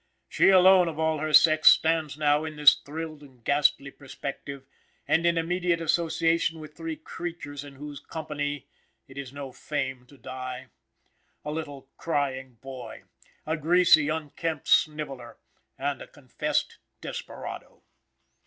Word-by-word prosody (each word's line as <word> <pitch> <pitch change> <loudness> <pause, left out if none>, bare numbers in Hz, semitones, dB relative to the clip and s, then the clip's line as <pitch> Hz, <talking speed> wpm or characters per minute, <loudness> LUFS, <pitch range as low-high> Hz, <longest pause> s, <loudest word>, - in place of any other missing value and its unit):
She - - +4
alone 185 -1 +7
of 160 -2 -4
all 160 -1 0
her 155 +1 -2
sex 155 +1 +7
stands 160 -2 +2
now 150 0 +2
in 155 -1 -6
this 150 -1 +8
thrilled 155 +1 -7
and 130 -5 -17
ghastly 140 0 +2
perspective, 140 0 -8 0.4
and 165 +1 +3
in 170 0 +2
immediate 175 +1 0
association 165 0 +1
with 155 -1 -10
three 165 -1 -5
creatures 155 -4 -7
in 140 -1 -12
whose 145 0 -8
company 145 -2 -5 0.4
it 135 - -15
is 135 -2 -7
no 140 -1 -7
fame 130 -2 -4
to 140 - -18
die: 130 0 -7 0.8
a 150 - -3
little 145 -4 -6
crying 135 -5 -2
boy, 130 -2 -9 0.4
a 160 - -1
greasy 165 -1 +4
unkempt 160 +1 -3
sniveller, 145 -6 0 0.4
and - - -2
a - - -9
confessed - - -3 0.2
desperado. - - -8
150 Hz, 135 wpm, -27 LUFS, 140-160 Hz, 0.8 s, this